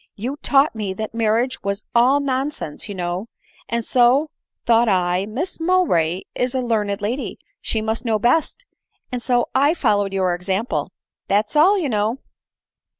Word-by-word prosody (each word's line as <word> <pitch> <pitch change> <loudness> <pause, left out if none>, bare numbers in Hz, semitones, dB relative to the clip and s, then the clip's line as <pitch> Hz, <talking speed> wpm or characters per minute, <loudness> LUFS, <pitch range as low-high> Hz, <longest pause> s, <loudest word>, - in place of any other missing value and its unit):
You 245 +7 -4
taught 285 0 +3
me 205 -4 -4
that 220 +3 -5
marriage 230 +3 0
was 200 +1 -3
all 250 +4 +4
nonsense, 265 - -3
you 200 - -5
know; 180 +3 -3 0.4
and 235 -1 -1
so 260 +5 +3 0.3
thought 235 0 +4
I, 180 0 +1
Miss 300 - -4
Mowbray 260 - +1
is 250 +1 -2
a - - +1
learned 210 -4 -1
lady, 240 +7 -3 0.2
she 220 -1 -2
mtist 220 +2 -2
know 225 -3 +1
best, 310 - +1 0.5
and 250 -1 -3
so 245 -1 +1
I 285 +5 +3
followed 205 - +1
your 190 -2 +1
example 190 +6 -2 0.2
— - - -70
that 210 +2 +1
's - - -16
aB, 360 +8 +5
you - - 0
know." 215 +2 0
230 Hz, 165 wpm, -21 LUFS, 200-265 Hz, 0.5 s, aB